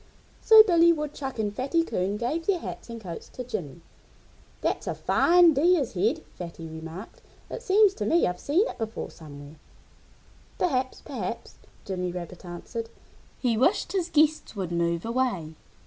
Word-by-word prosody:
So 440 Hz, -1 st, +9 dB
Billy 340 Hz, -4 st, +5 dB
Woodchuck 295 Hz, -4 st, -4 dB
and 210 Hz, -2 st, -2 dB
Fatty 280 Hz, +7 st, +1 dB
Coon 200 Hz, -, -2 dB
gave 300 Hz, +9 st, -2 dB
their 400 Hz, -3 st, +3 dB
hats 330 Hz, -, -8 dB
and 230 Hz, 0 st, -6 dB
coats 175 Hz, -6 st, -8 dB
to 250 Hz, -, -7 dB
Jimmy. 180 Hz, -, -6 dB, 0.8 s
"That's -, -, -1 dB
a -, -, -2 dB
fine 345 Hz, -1 st, +5 dB
Deer's 300 Hz, -1 st, +2 dB
head," 200 Hz, +4 st, 0 dB
Fatty 170 Hz, -2 st, -8 dB
remarked. 160 Hz, +5 st, -9 dB, 0.3 s
"It -, -, -5 dB
seems 415 Hz, -3 st, +4 dB
to 410 Hz, -, -4 dB
me 340 Hz, -, +3 dB
I've 180 Hz, 0 st, -2 dB
seen 350 Hz, +11 st, +2 dB
it -, -, -8 dB
before 225 Hz, -1 st, -4 dB
somewhere." 145 Hz, -1 st, -12 dB, 1.0 s
"Perhaps! 260 Hz, -7 st, -1 dB
Perhaps!" -, -, -6 dB, 0.3 s
Jimmy 180 Hz, -2 st, -3 dB
Rabbit 175 Hz, 0 st, -8 dB
answered. 205 Hz, +6 st, -6 dB, 0.5 s
He 245 Hz, -3 st, 0 dB
wished 305 Hz, -, +2 dB
his 365 Hz, -3 st, -1 dB
guests 310 Hz, -5 st, +2 dB
would 185 Hz, -4 st, -4 dB
move 170 Hz, +1 st, 0 dB
away. 230 Hz, -10 st, -1 dB
235 Hz, 155 wpm, -26 LUFS, -, 1.0 s, So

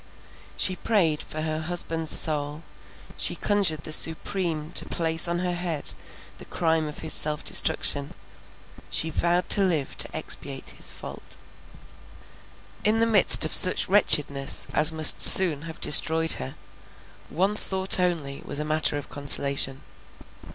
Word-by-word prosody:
She 185 Hz, -1 st, 0 dB
prayed 170 Hz, -10 st, -1 dB
for 155 Hz, 0 st, -6 dB
her 155 Hz, 0 st, -4 dB
husband's 165 Hz, -1 st, -2 dB
soul; 150 Hz, 0 st, -2 dB, 0.5 s
she -, -, 0 dB
conjured 190 Hz, -8 st, 0 dB
the -, -, -8 dB
Supreme 160 Hz, 0 st, +2 dB
to -, -, 0 dB
place 165 Hz, 0 st, -1 dB
on 170 Hz, 0 st, -3 dB
her 180 Hz, 0 st, -3 dB
head 175 Hz, -4 st, -5 dB, 0.5 s
the -, -, -12 dB
crime 160 Hz, -2 st, -2 dB
of 150 Hz, -, -10 dB
his 155 Hz, -, -4 dB
self 150 Hz, -1 st, -3 dB
destruction—she 145 Hz, +2 st, -2 dB
vowed 175 Hz, +3 st, -2 dB
to 205 Hz, -, +4 dB
live 165 Hz, -8 st, -2 dB
to -, -, -1 dB
expiate -, -, -6 dB
his -, -, -5 dB
fault. -, -, -8 dB, 1.5 s
In 215 Hz, +1 st, +1 dB
the 230 Hz, -, +2 dB
midst 205 Hz, -7 st, +4 dB
of 155 Hz, -, -5 dB
such 185 Hz, -, +5 dB
wretchedness 145 Hz, -8 st, 0 dB
as 150 Hz, +1 st, +5 dB
must 160 Hz, -1 st, +3 dB
soon 170 Hz, -7 st, +4 dB
have 160 Hz, -, -12 dB
destroyed 160 Hz, +1 st, +4 dB
her, 65 Hz, -, -6 dB, 0.7 s
one 190 Hz, +6 st, -2 dB
thought 190 Hz, -2 st, +1 dB
only 165 Hz, -7 st, -3 dB
was 145 Hz, -, -5 dB
matter 155 Hz, -1 st, -1 dB
of 145 Hz, -, -9 dB
consolation. 140 Hz, -1 st, +2 dB
160 Hz, 135 wpm, -23 LUFS, 150-180 Hz, 1.5 s, such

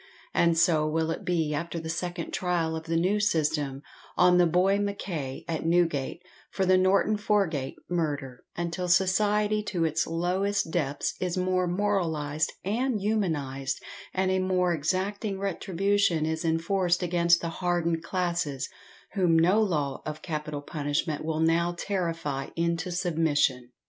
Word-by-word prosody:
And 170 Hz, -1 st, +3 dB
so 160 Hz, -2 st, +3 dB
will 160 Hz, +1 st, 0 dB
it -, -, -4 dB
be 165 Hz, -4 st, 0 dB
after 170 Hz, +2 st, -3 dB
the 160 Hz, -, -7 dB
second 175 Hz, +1 st, -3 dB
trial 170 Hz, -3 st, 0 dB
of 160 Hz, 0 st, -6 dB
the 165 Hz, 0 st, 0 dB
new 190 Hz, +5 st, +2 dB
system, 150 Hz, -8 st, 0 dB, 0.3 s
on 180 Hz, 0 st, +5 dB
the 175 Hz, -, +5 dB
boy 185 Hz, +4 st, +3 dB
MACKAY, 175 Hz, -9 st, -4 dB
at 160 Hz, -2 st, -2 dB
Newgate, 165 Hz, -2 st, +1 dB, 0.3 s
for 190 Hz, -, -1 dB
the 185 Hz, 0 st, +5 dB
Norton 195 Hz, +3 st, +3 dB
Forgate 195 Hz, -10 st, 0 dB
murder, 145 Hz, -7 st, -2 dB
until 175 Hz, +1 st, -2 dB
society 210 Hz, +3 st, +3 dB
to 175 Hz, -5 st, 0 dB
its 160 Hz, 0 st, 0 dB
lowest 180 Hz, +3 st, 0 dB
depths 145 Hz, -5 st, -1 dB
is 180 Hz, -1 st, -2 dB
more 185 Hz, 0 st, +1 dB
moralised 165 Hz, -6 st, 0 dB
and 230 Hz, +3 st, 0 dB
humanised; 145 Hz, -11 st, -1 dB, 0.3 s
and 190 Hz, 0 st, 0 dB
a 190 Hz, -, +2 dB
more 185 Hz, -1 st, +1 dB
exacting 190 Hz, +6 st, -1 dB
retribution 195 Hz, -2 st, +1 dB
is 160 Hz, +2 st, -2 dB
enforced 175 Hz, +2 st, +1 dB
against 170 Hz, -1 st, +3 dB
the 170 Hz, -, -2 dB
hardened 170 Hz, -2 st, +1 dB
classes, 170 Hz, -6 st, -2 dB, 0.4 s
whom 180 Hz, -5 st, +3 dB
no 180 Hz, +7 st, +4 dB
law 150 Hz, -10 st, -1 dB
of 155 Hz, 0 st, -6 dB
capital 150 Hz, -3 st, -4 dB
punishment 145 Hz, +1 st, -2 dB
will 160 Hz, 0 st, -1 dB
now 170 Hz, +2 st, +2 dB
terrify 165 Hz, -8 st, -2 dB
into 170 Hz, +1 st, -1 dB
submission. 160 Hz, -8 st, +1 dB
170 Hz, 145 wpm, -27 LUFS, 160-185 Hz, 0.4 s, on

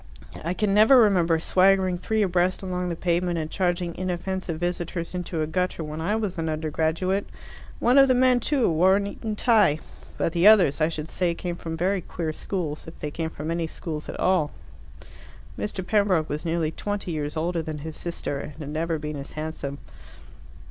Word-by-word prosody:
I 170 Hz, +3 st, -2 dB
can 205 Hz, -1 st, +1 dB
never 220 Hz, +6 st, +7 dB
remember 180 Hz, -8 st, +4 dB
swaggering 185 Hz, +1 st, +3 dB
three 220 Hz, +2 st, +1 dB
abreast 180 Hz, 0 st, +1 dB
along 180 Hz, -1 st, -2 dB
the 170 Hz, -, -2 dB
pavement 175 Hz, 0 st, 0 dB
and 155 Hz, -1 st, -3 dB
charging 175 Hz, -2 st, 0 dB
inoffensive 185 Hz, -2 st, -3 dB
visitors 175 Hz, 0 st, -3 dB
into 175 Hz, -3 st, -2 dB
a -, -, 0 dB
gutter 175 Hz, +1 st, -1 dB
when 155 Hz, +1 st, -5 dB
I 205 Hz, +6 st, 0 dB
was 205 Hz, -6 st, -2 dB
an 160 Hz, -1 st, -1 dB
undergraduate. 160 Hz, +5 st, -1 dB, 0.5 s
One 250 Hz, +3 st, +4 dB
of 270 Hz, -, +7 dB
the 255 Hz, -, +4 dB
men, 250 Hz, 0 st, +4 dB
too, 265 Hz, 0 st, +1 dB
wore 180 Hz, +4 st, +4 dB
an 200 Hz, 0 st, 0 dB
Eton 215 Hz, +1 st, -4 dB
tie. 210 Hz, -10 st, +4 dB, 0.4 s
But 165 Hz, -, 0 dB
the 175 Hz, +3 st, +4 dB
others, 185 Hz, -9 st, +6 dB
I 155 Hz, -, +4 dB
should 155 Hz, -1 st, -5 dB
say, 175 Hz, 0 st, -1 dB
came 175 Hz, 0 st, -4 dB
from 165 Hz, -1 st, -6 dB
very 185 Hz, +3 st, +1 dB
queer 160 Hz, -1 st, -4 dB
schools, 160 Hz, -4 st, -4 dB
if 165 Hz, -, -10 dB
they 150 Hz, -, -4 dB
came 160 Hz, +1 st, -3 dB
from 155 Hz, 0 st, -5 dB
any 165 Hz, -1 st, -1 dB
schools 155 Hz, -1 st, -6 dB
at -, -, -6 dB
all." 180 Hz, -5 st, +2 dB, 1.1 s
Mr. 195 Hz, -3 st, -4 dB
Pembroke 195 Hz, -6 st, +2 dB
was 150 Hz, +3 st, -3 dB
nearly 165 Hz, -1 st, 0 dB
twenty 205 Hz, 0 st, -4 dB
years 150 Hz, -1 st, -3 dB
older 170 Hz, +1 st, 0 dB
than 155 Hz, -1 st, -5 dB
his 155 Hz, +1 st, -7 dB
sister, 170 Hz, -4 st, -4 dB
and 150 Hz, -, -7 dB
had 150 Hz, -1 st, -8 dB
never 160 Hz, +2 st, -1 dB
been 150 Hz, -1 st, -5 dB
as 140 Hz, 0 st, -8 dB
handsome. 155 Hz, -2 st, -5 dB
175 Hz, 190 wpm, -25 LUFS, 160-190 Hz, 1.1 s, never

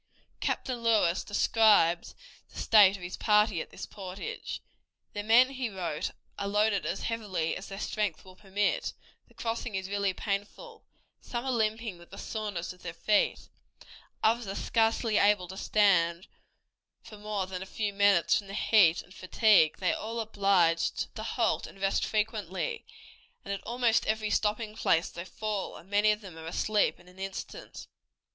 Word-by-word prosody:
Captain 255 Hz, -2 st, -2 dB
Lewis 215 Hz, -7 st, +2 dB
described 205 Hz, -5 st, +3 dB, 0.3 s
the -, -, -15 dB
state 200 Hz, -3 st, +6 dB
of 180 Hz, -, -12 dB
his 175 Hz, -, -5 dB
party 210 Hz, -4 st, +3 dB
at -, -, -8 dB
this -, -, -8 dB
portage. 190 Hz, -1 st, -7 dB, 0.5 s
"The 205 Hz, -, -3 dB
men," 235 Hz, +5 st, +5 dB
he 260 Hz, -3 st, -3 dB
wrote, 175 Hz, -6 st, -3 dB, 0.3 s
"are 200 Hz, -, -2 dB
loaded 205 Hz, -4 st, +1 dB
as 170 Hz, -, -3 dB
heavily 200 Hz, -8 st, -2 dB
as 195 Hz, -, -7 dB
their 195 Hz, 0 st, -7 dB
strength 205 Hz, -7 st, -2 dB
will 185 Hz, -1 st, -14 dB
permit; 200 Hz, +1 st, -1 dB, 0.3 s
the -, -, -25 dB
crossing 230 Hz, -2 st, -3 dB
is 190 Hz, 0 st, -3 dB
really 200 Hz, -1 st, 0 dB
painful; 205 Hz, -, -5 dB, 0.4 s
some 240 Hz, +1 st, -5 dB
are 265 Hz, -, 0 dB
limping 220 Hz, -4 st, -1 dB
with 170 Hz, -, -16 dB
the -, -, -11 dB
soreness 205 Hz, -5 st, -4 dB
of 180 Hz, -, -21 dB
their 165 Hz, -1 st, -7 dB
feet, 210 Hz, +4 st, +1 dB, 0.8 s
others 230 Hz, 0 st, +2 dB
are 195 Hz, -, -4 dB
scarcely 225 Hz, -1 st, +1 dB
able 200 Hz, -3 st, +3 dB
to 190 Hz, -, -7 dB
stand 180 Hz, -4 st, +2 dB, 0.8 s
for 215 Hz, -, -12 dB
more 210 Hz, -2 st, -2 dB
than 185 Hz, -1 st, -6 dB
a 190 Hz, -, -7 dB
few 205 Hz, 0 st, -3 dB
minutes 200 Hz, -3 st, +4 dB
from 200 Hz, -, -10 dB
the 195 Hz, -, -7 dB
heat 190 Hz, -7 st, +4 dB
and 180 Hz, -, -18 dB
fatigue; 195 Hz, -4 st, +3 dB
they 185 Hz, -, +1 dB
are -, -, -5 dB
all 225 Hz, +2 st, -4 dB
obliged 195 Hz, -6 st, +1 dB
to -, -, -5 dB
halt 225 Hz, 0 st, 0 dB
and 195 Hz, -, -14 dB
rest 195 Hz, 0 st, +1 dB
frequently, 215 Hz, -, -2 dB, 0.6 s
and 200 Hz, -, -3 dB
at 200 Hz, -, -5 dB
almost 235 Hz, 0 st, +1 dB
every 215 Hz, -1 st, 0 dB
stopping 215 Hz, +1 st, 0 dB
place 165 Hz, -6 st, +2 dB
they 170 Hz, -, -7 dB
fall, 210 Hz, +1 st, -4 dB
and 190 Hz, -, -16 dB
many 205 Hz, +1 st, +4 dB
of 210 Hz, +1 st, -2 dB
them 180 Hz, -5 st, -10 dB
are 160 Hz, -, -8 dB
asleep 210 Hz, +5 st, +1 dB
in -, -, -19 dB
an 180 Hz, +1 st, -17 dB
instant." 195 Hz, 0 st, -7 dB
205 Hz, 170 wpm, -29 LUFS, 185-220 Hz, 0.8 s, state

